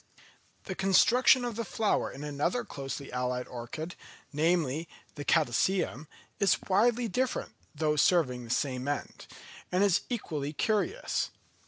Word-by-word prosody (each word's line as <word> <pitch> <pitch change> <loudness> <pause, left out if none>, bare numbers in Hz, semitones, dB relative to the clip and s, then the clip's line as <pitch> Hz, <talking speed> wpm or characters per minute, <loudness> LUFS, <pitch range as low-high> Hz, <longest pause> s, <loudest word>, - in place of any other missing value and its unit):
The 190 - -4
construction 240 +7 +5
of 240 -3 -3
the 230 - -2
flower 220 0 0
in 140 - -8
another 150 +12 -1
closely 135 0 -6
allied 125 0 -2
orchid, 140 +8 -6 0.4
namely, 160 0 +1 0.2
the 145 - -6
Catasetum, 155 +1 +1 0.3
is 195 -3 +4
widely 230 +5 +3
different, 255 +5 -1 0.2
though 150 0 +1
serving 135 -6 +3
the 115 - -11
same 130 +1 -1
end; 145 -1 -4 0.4
and 180 +2 +3
is 200 -4 +3
equally 155 - -3
curious. 230 - 0
160 Hz, 130 wpm, -30 LUFS, 140-205 Hz, 0.4 s, construction